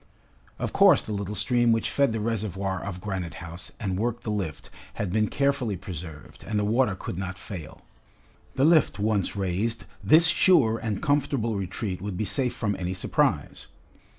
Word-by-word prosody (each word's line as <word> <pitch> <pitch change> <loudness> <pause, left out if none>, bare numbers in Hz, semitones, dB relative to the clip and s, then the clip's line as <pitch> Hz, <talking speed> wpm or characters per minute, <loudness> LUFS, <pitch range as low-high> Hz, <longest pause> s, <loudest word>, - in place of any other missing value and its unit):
Of - - -3
course - - +6
the - - -7
little 100 0 -3
stream 120 +4 +3
which 115 -1 +1
fed 140 -3 +2
the 110 - -2
reservoir 100 -4 -2
of 95 -2 -6
Granite 95 -5 -4
House 85 +2 -6
and 95 -2 -2
worked 120 +1 -2
the 110 - -2
lift, 95 -8 -4 0.2
had 95 -3 -3
been 110 0 +2
carefully 140 -7 0
preserved, 85 -5 -9
and 110 - -2
the 105 - +1
water 110 -1 +2
could 90 - -6
not 95 0 -4
fail. 80 -5 -9 0.7
The 135 - +3
lift 155 - +4
once 105 -2 0
raised, 100 +4 -1 0.2
this 155 - +6
sure 160 -9 +4
and 105 -4 -3
comfortable 140 -6 +1
retreat 95 0 -4
would 100 -2 -4
be 110 - -1
safe 125 +6 0
from 105 -3 -1
any 90 0 -2
surprise. 90 - 0
105 Hz, 175 wpm, -26 LUFS, 95-115 Hz, 0.7 s, course